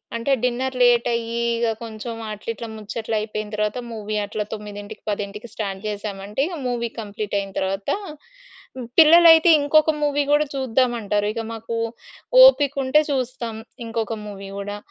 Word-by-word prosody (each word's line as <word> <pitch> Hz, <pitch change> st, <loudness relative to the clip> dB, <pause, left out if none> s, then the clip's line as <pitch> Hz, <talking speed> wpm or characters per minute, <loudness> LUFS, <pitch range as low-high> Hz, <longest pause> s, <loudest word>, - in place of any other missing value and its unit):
అంటే 230 Hz, +4 st, -1 dB
డిన్నర్ 255 Hz, +1 st, -1 dB
లేటయ్యి, 235 Hz, -1 st, +2 dB, 0.2 s
ఇగ 235 Hz, 0 st, +1 dB, 0.2 s
కొంచుం 225 Hz, +1 st, -6 dB
అట్లా 210 Hz, +1 st, -7 dB
ఇట్లా 230 Hz, -, -7 dB
ముచ్చట్లైపోయిన 215 Hz, 0 st, -4 dB
తర్వాత 210 Hz, +2 st, -1 dB
మూవీ 215 Hz, -1 st, -5 dB
అట్లా 210 Hz, +1 st, -3 dB
9 210 Hz, 0 st, -8 dB
10 205 Hz, +2 st, -4 dB
స్టార్ట్ 195 Hz, -3 st, -4 dB
చేశామంటే 205 Hz, +2 st, -4 dB
ఇగ 350 Hz, -2 st, -6 dB
మూవీ 235 Hz, -1 st, -2 dB
కంప్లీటయిన 205 Hz, -1 st, -4 dB
తర్వాత 195 Hz, +1 st, -2 dB, 1.1 s
పిల్లలైతే 330 Hz, +1 st, +8 dB
ఇంకొక 310 Hz, +2 st, +4 dB
మూవీ 290 Hz, 0 st, +1 dB
కూడా 295 Hz, +1 st, +4 dB
చూద్దామంటారు. 240 Hz, -5 st, 0 dB
ఇక 230 Hz, -, -3 dB
మాకు 225 Hz, +1 st, -6 dB, 0.7 s
ఓపికుంటే 285 Hz, -, +5 dB
చూస్తాం 250 Hz, -3 st, -3 dB, 0.3 s
ఇంకొక 225 Hz, 0 st, -2 dB
మూవీ 195 Hz, -1 st, -8 dB
గూడా. 205 Hz, +1 st, -5 dB
225 Hz, 125 wpm, -22 LUFS, 210-255 Hz, 1.1 s, పిల్లలైతే